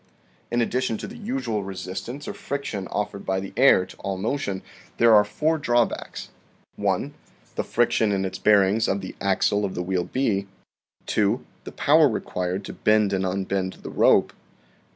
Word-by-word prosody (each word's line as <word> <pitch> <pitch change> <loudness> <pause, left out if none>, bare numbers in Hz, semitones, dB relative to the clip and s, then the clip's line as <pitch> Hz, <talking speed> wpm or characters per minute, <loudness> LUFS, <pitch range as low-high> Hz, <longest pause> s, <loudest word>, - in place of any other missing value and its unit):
In 120 0 +1
addition 125 -1 0
to - - -6
the 225 - -10
usual 230 - -2
resistance 95 +8 -6
or - - -4
friction 125 -9 -4
offered 100 -1 -3
by 95 0 -1
the 95 0 -7
air 130 -8 +5
to - - -14
all 100 -1 -4
motion, 100 -2 -2 0.3
there 115 -1 +6
are 105 -1 +7
four 155 +10 0
drawbacks: 120 -4 -1 0.5
1. - - -1 0.4
The - - -2
friction 115 -2 +1
in 95 -1 0
its 95 - -5
bearings 105 +1 +4
of 100 +1 0
the 95 - -7
axle 100 +1 +2
of 95 -2 -2
the 90 - -2
wheel 90 -1 -1
B. 105 -7 0 0.6
2. 105 +3 +1 0.2
The - - -7
power - - +4
required 90 +2 -3
to - - -7
bend 105 -2 +2
and 95 0 0
unbend 95 0 -1
the - - -6
rope. - - +4
100 Hz, 170 wpm, -24 LUFS, 95-120 Hz, 0.6 s, are